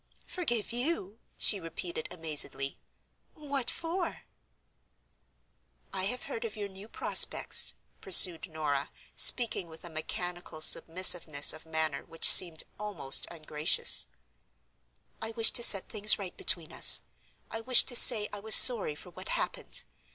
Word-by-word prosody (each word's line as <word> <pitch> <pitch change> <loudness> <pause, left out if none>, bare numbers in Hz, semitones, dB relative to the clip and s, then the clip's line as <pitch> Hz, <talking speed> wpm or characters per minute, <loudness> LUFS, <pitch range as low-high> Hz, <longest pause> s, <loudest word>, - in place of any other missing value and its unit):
"Forgive 240 - -6
you!" 240 - -7 0.2
she 205 - -3
repeated, 165 -1 -10
amazedly. 150 -4 -6 0.6
"What 285 -4 -5
for?" 340 +2 -9 1.7
"I 190 -1 -5
have 250 +5 -8
heard 225 - -11
of 225 -1 -10
your 205 -2 -10
new 195 +2 -16
prospects," - - +1 0.3
pursued 185 -1 +3
Norah, 150 -3 -7 0.3
speaking 225 -7 +2
with 160 0 -18
a 170 - -12
mechanical 175 +1 -9
submissiveness 165 -2 +1
of 155 +1 -17
manner 160 -3 -6
which 165 0 +1
seemed 170 -4 +4 0.2
almost 205 -10 -1
ungracious; 155 - -3 1.1
"I 220 - -7
wished 225 -1 +2
to 240 - -1
set 195 -4 +5
things 210 0 +1
right 190 -3 -11
between 165 -3 -1
us; - - +6 0.5
I 225 - -8
wished 250 +1 +6
to 245 - -4
say 225 -3 +6
I 205 - -9
was 215 +2 +2
sorry 220 - +5
for 180 +4 -17
what - - -14
happened. - - -3
185 Hz, 135 wpm, -25 LUFS, 160-225 Hz, 1.7 s, us